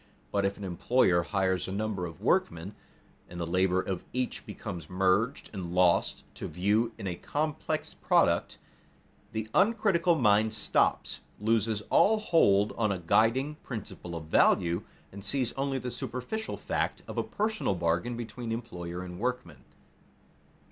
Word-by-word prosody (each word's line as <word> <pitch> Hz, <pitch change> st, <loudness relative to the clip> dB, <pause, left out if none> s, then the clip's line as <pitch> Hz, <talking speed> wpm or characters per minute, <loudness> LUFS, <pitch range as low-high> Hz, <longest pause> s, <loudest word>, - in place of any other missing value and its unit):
But 100 Hz, -1 st, +1 dB
if 100 Hz, 0 st, -1 dB
an 100 Hz, -, -8 dB
employer 90 Hz, 0 st, +2 dB
hires 95 Hz, 0 st, 0 dB
a -, -, -4 dB
number 100 Hz, -3 st, -2 dB
of 80 Hz, +2 st, -11 dB
workmen, 105 Hz, -, +1 dB, 0.6 s
and 90 Hz, -, -8 dB
the 85 Hz, -, -1 dB
labor 90 Hz, +2 st, +2 dB
of 95 Hz, -1 st, -3 dB
each 125 Hz, 0 st, -3 dB
becomes 90 Hz, -8 st, -7 dB
merged 95 Hz, +7 st, +1 dB
and 90 Hz, -3 st, -5 dB
lost 90 Hz, -1 st, +3 dB
to -, -, -4 dB
view 105 Hz, +6 st, +1 dB
in 110 Hz, -, -7 dB
a 90 Hz, -, -1 dB
complex 150 Hz, -, -2 dB
product, -, -, +2 dB, 0.7 s
the 110 Hz, 0 st, -3 dB
uncritical 195 Hz, -5 st, +3 dB
mind 110 Hz, -4 st, +3 dB
stops, 105 Hz, -, +1 dB, 0.2 s
loses 110 Hz, 0 st, +1 dB
all 220 Hz, +2 st, +5 dB
hold 105 Hz, -, +3 dB
on 110 Hz, -2 st, +2 dB
a 95 Hz, -, -1 dB
guiding 115 Hz, -, +2 dB
principle 100 Hz, -7 st, -7 dB
of 80 Hz, -2 st, -6 dB
value, 85 Hz, +2 st, +3 dB, 0.3 s
and 100 Hz, +1 st, -9 dB
sees 125 Hz, +2 st, 0 dB
only 135 Hz, 0 st, -1 dB
the 125 Hz, -1 st, -4 dB
superficial 130 Hz, -, -4 dB
fact -, -, -2 dB
of -, -, -3 dB
a -, -, +1 dB
personal 215 Hz, -, -1 dB
bargain 85 Hz, +8 st, 0 dB
between 120 Hz, 0 st, -5 dB
employer 90 Hz, -7 st, -5 dB
and 90 Hz, -1 st, -8 dB
workman. 125 Hz, +2 st, -3 dB
105 Hz, 150 wpm, -29 LUFS, 90-125 Hz, 0.7 s, all